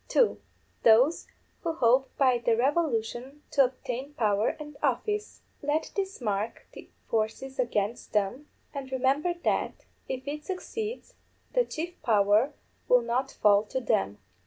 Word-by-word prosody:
_ - - -37
(2) 485 - +3 0.4
_Those 245 +9 +5 0.3
who 335 -2 -1
hope 260 -2 +3
by 255 -3 +4
the 230 -1 +2
revolution 265 -1 0
to 275 -2 +5
obtain 260 +2 -5
power 210 -1 +1
and 295 -1 -8
office. 420 0 -1 0.2
Let 295 +2 -1
these 390 -1 -2
mark 215 -1 -2
the - - -11 0.2
forces 225 +5 -2
against 230 -2 -1
them, 210 +8 0 0.3
and 275 -2 -6
remember 275 +7 +1
that, - - -1 0.2
if 260 +1 -4
it 300 +1 -4
succeeds, 430 +6 -5 0.4
the - - +3
chief 345 +3 -6
power 210 +3 +3 0.3
will 250 -1 +5
not 245 +3 0
fall 205 -1 +7
to 260 - -2
them. 100 - 0
260 Hz, 140 wpm, -28 LUFS, 225-300 Hz, 0.4 s, fall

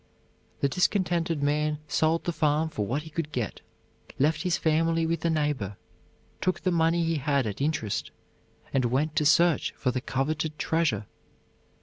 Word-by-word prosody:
The 140 - +4
discontented 170 -1 +1
man 150 +1 +1
sold 160 +3 +1
the 175 - -2
farm 155 0 +1
for 105 -9 -3
what 140 +7 -1
he 160 - -11
could 155 -1 -3
get, 120 -7 -3 0.6
left 150 +4 +2
his 180 -3 +1
family 165 +1 +2
with 165 +1 -1
a - - +3
neighbor, 145 - -1 0.6
took 185 0 0
the 185 - +1
money 170 0 +2
he 165 -1 0
had 140 -2 +1
at 105 +2 -4
interest, 140 -8 -1 0.6
and 135 -2 +2
went 145 +6 0
to 150 -2 +4
search 170 0 +3
for 125 - 0
the 125 0 -2
coveted 150 +4 -2
treasure. 150 -13 0
155 Hz, 160 wpm, -27 LUFS, 140-165 Hz, 0.6 s, The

